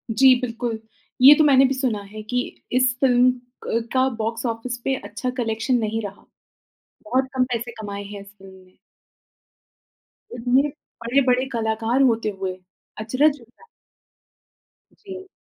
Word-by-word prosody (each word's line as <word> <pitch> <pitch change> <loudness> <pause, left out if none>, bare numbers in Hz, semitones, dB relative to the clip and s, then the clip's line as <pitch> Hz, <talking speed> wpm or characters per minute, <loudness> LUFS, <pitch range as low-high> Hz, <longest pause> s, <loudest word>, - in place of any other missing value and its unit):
जी, 260 +4 +6
बिल्कुल, 235 -2 -3 0.4
ये 275 +3 +10
तो 310 - +3
मैंने 270 -2 +6
भी 265 - +1
सुना 255 -6 -1
है 210 +2 -10
कि 245 +3 -1 0.3
इस 255 0 +3
फ़िल्म 250 -1 +4 0.3
क 230 0 -2
का 260 0 +3
बॉक्स 225 +2 -3
ऑफिस 235 +1 -3
पे 270 - 0
अच्छा 255 0 -5
कलेक्शन 225 +1 0
नहीं 220 0 -2
रहा। 200 -1 -9 0.8
बहुत 265 -4 0
कम 260 -1 +2
पैसे 235 0 -3
कमाए 200 -1 -6
हैं 200 0 -9
इस 200 - -14
फ़िल्म 195 -1 -14
ने। 185 - -27 1.6
इतने 245 +2 +2 0.4
बड़े-बड़े 255 +1 +2
कलाकार 225 +2 0
होते 225 -1 -2
हुए, 190 -1 -3 0.5
अचरज 280 +7 +2
होता 240 - -21
है। - - -18 1.4
जी। 380 -1 -9
240 Hz, 145 wpm, -22 LUFS, 220-260 Hz, 1.6 s, ये